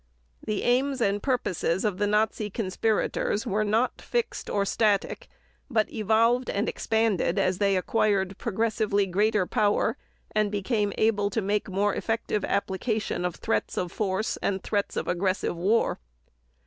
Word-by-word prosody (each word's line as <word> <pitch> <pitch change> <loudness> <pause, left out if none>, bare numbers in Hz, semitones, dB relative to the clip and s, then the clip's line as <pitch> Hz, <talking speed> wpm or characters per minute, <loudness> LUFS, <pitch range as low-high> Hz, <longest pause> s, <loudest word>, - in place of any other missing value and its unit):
The 210 -1 -2
aims 265 +2 +2
and 205 -3 +1
purposes 190 -8 0
of 205 -3 -1
the 205 - +2
Nazi 210 0 +1
conspirators 210 +1 -1
were 215 -2 0
not 220 +4 0
fixed 475 -1 -2
or 200 -1 +1
static 215 - 0 0.4
but 220 -5 0
evolved 230 +3 +2
and 205 +3 -1
expanded 220 -6 0
as 185 0 +1
they 200 -2 +3
acquired 195 -1 0
progressively 220 -2 0
greater 205 +2 +1
power 205 +2 +1 0.3
and 215 -1 +1
became 205 0 0
able 205 -2 +2
to 220 +3 -1
make 205 +1 -1
more 200 +2 +1
effective 225 -2 -2
application 200 -1 -1
of 180 -2 -2
threats 110 -1 -2
of 180 -2 -2
force 200 +1 -1
and 190 -1 -2
threats 205 -2 -1
of - - -2
aggressive 185 +1 0
war. 200 +7 +1
210 Hz, 145 wpm, -27 LUFS, 195-225 Hz, 0.4 s, they